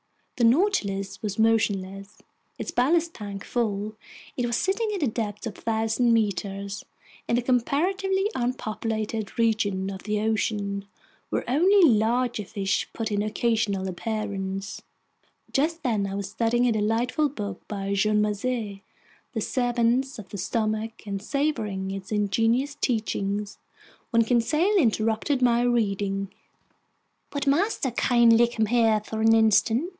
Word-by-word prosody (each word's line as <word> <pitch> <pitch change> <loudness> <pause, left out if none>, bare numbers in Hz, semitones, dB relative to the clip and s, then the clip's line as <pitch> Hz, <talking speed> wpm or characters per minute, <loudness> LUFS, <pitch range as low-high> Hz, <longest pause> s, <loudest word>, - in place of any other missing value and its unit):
The 235 - +5
Nautilus 230 - +1
was 205 -2 -3
motionless. 200 -3 0 0.4
Its - - -4
ballast 325 +6 +2
tanks 200 -2 -7
full, 215 -3 -1 0.4
it 245 -1 -1
was 235 - 0
sitting 415 +4 0
at 370 - -2
a - - +3
depth 215 -2 -3
of 225 - -5
1,000 225 +2 +1
meters 200 -2 -1 0.4
in 235 - +2
a 245 - 0
comparatively 375 - +1
unpopulated 220 -3 -3
region 205 -4 +1
of 190 -1 -7
the 210 0 -1
ocean 205 -2 -1 0.4
where - - -2
only 355 +8 +5
larger 235 0 +1
fish 195 -1 -2
put 225 -1 -3
in 205 0 +1
occasional 215 -3 0
appearances. 195 -1 -4 0.7
Just 320 +4 0
then 215 -5 0
I 195 - -4
was 200 -1 -4
studying 240 +1 +1
a 245 - +3
delightful 230 +7 +1
book 205 -8 -6
by 200 -1 -3
Jean 210 +1 +2
Macé, 210 -1 -2 0.5
The 225 - -2
Servants 245 +2 +1
of 200 -4 -10
the 200 - -6
Stomach, 220 +2 -2
and 200 -1 -4
savoring 215 -8 -1
its 195 +1 -7
ingenious 225 +6 +1
teachings, 210 -6 -2 0.5
when 230 -1 +4
Conseil 300 - +2
interrupted 225 +1 +1
my 240 -1 +4
reading. 200 -5 0 1.0
"Would 285 -1 -2
master 285 - +1
kindly 235 -1 +4
come 230 -2 0
here 225 -1 +3
for 220 +1 -4
an 225 0 +5
instant?" 225 - +3
225 Hz, 135 wpm, -25 LUFS, 205-245 Hz, 1.0 s, The